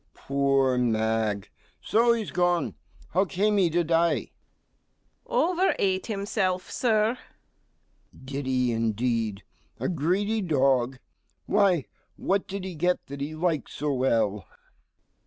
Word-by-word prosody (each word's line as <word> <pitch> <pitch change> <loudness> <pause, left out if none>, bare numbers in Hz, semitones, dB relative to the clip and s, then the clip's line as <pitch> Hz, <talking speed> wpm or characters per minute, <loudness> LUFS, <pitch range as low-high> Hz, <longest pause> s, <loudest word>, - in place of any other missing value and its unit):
MR. - - -44
G. - - -44 0.2
Poor 135 -2 +2
mag! 110 -3 0 0.3
so 235 +2 +3
he's 225 -3 -3
gone. 175 -1 +1 0.4
How 185 +4 +2
came 205 +2 +1
he 185 -4 +4
to 170 +2 +1
die? 165 +1 +1 0.9
STEWARD. - - -26 0.3
Over 380 - +3
ate 190 -1 0
himself, 195 -3 -1
Sir. 225 0 +1 1.0
MR. 130 - -16
G. 135 - -9
Did 140 0 -3
he 125 -2 +1
indeed? 115 -2 -1 0.4
a - - -1
greedy 190 +7 0
dog. 135 -6 +2 0.5
Why, 195 -8 +3 0.3
what 195 0 0
did 195 0 -5
he 190 - -5
get 175 +3 0
that 140 0 -7
he 150 +3 -4
liked 155 -5 -1
so 145 0 -2
well? 115 -6 0
160 Hz, 140 wpm, -26 LUFS, 125-190 Hz, 1.0 s, he